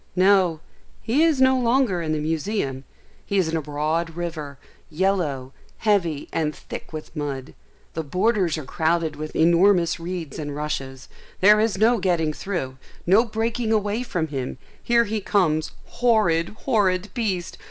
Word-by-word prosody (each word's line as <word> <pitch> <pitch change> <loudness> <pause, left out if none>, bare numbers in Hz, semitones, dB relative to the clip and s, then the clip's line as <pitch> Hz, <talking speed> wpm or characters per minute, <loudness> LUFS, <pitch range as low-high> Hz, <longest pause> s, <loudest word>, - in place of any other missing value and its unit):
No, 185 -4 +4 0.4
he 240 +7 +2
is 320 -4 +3
no 260 0 +5
longer 240 -6 +2
in 155 -2 -2
the 155 - 0
museum; 155 -3 -2 0.4
he 200 - -2
is 185 -4 +3
in 165 - -1
a 160 - 0
broad 155 +3 -2
river, 160 -5 -5 0.3
yellow, 155 -7 -1 0.2
heavy, 175 -9 +1
and 155 -2 -1
thick - - -9
with 155 +1 -8
mud; 140 -2 -4 0.4
the 160 - -2
borders 180 +2 +1
are 155 - -6
crowded 160 +1 0
with 155 +1 -7
enormous 170 +1 +4
reeds 165 -3 -5
and 145 -2 -4
rushes; 135 -3 -4 0.3
there 210 +2 +6
is 215 -3 +1
no 225 +3 +4
getting 165 -4 +1
through; 150 -9 -4 0.3
no 195 +6 +5
breaking 225 +1 -2
away 210 +1 +1
from 170 -10 -2
him; 130 -3 -4 0.2
here 235 0 +3
he 215 -1 -3
comes; 160 -6 +1 0.2
horrid, 210 -9 +2 0.2
horrid 205 -6 +1
beast! 195 -8 -2
175 Hz, 150 wpm, -23 LUFS, 155-210 Hz, 0.4 s, there